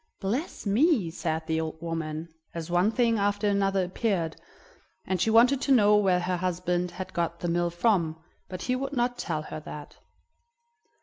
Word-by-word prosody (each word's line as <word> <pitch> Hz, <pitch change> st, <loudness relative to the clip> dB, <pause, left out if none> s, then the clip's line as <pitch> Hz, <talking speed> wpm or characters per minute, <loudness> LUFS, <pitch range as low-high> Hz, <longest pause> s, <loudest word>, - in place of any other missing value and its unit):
"Bless 235 Hz, -, -3 dB
me!" 215 Hz, -, +3 dB
said 160 Hz, -2 st, -3 dB
the 160 Hz, 0 st, 0 dB
old 160 Hz, 0 st, -5 dB
woman 165 Hz, -1 st, -4 dB, 0.3 s
as 165 Hz, 0 st, -5 dB
one 175 Hz, +4 st, +3 dB
thing 230 Hz, -1 st, +2 dB
after 205 Hz, +1 st, +1 dB
another 195 Hz, -2 st, +2 dB
appeared; 180 Hz, -4 st, -1 dB, 0.7 s
and 185 Hz, -2 st, -1 dB
she -, -, +2 dB
wanted 245 Hz, +5 st, +5 dB
to 280 Hz, -, 0 dB
know 210 Hz, -5 st, +6 dB
where 190 Hz, -3 st, +3 dB
her 180 Hz, 0 st, -1 dB
husband 180 Hz, 0 st, -1 dB
had 185 Hz, +1 st, -7 dB
got 170 Hz, 0 st, -2 dB
the 175 Hz, -, -1 dB
mill 175 Hz, 0 st, +1 dB
from, 170 Hz, -3 st, +1 dB, 0.3 s
but 185 Hz, -1 st, -6 dB
he 255 Hz, -, 0 dB
would 270 Hz, +2 st, -3 dB
not 245 Hz, -1 st, 0 dB
tell 155 Hz, -, -2 dB
her 155 Hz, -, -6 dB
that. 150 Hz, -1 st, -10 dB
185 Hz, 175 wpm, -27 LUFS, 170-220 Hz, 0.7 s, know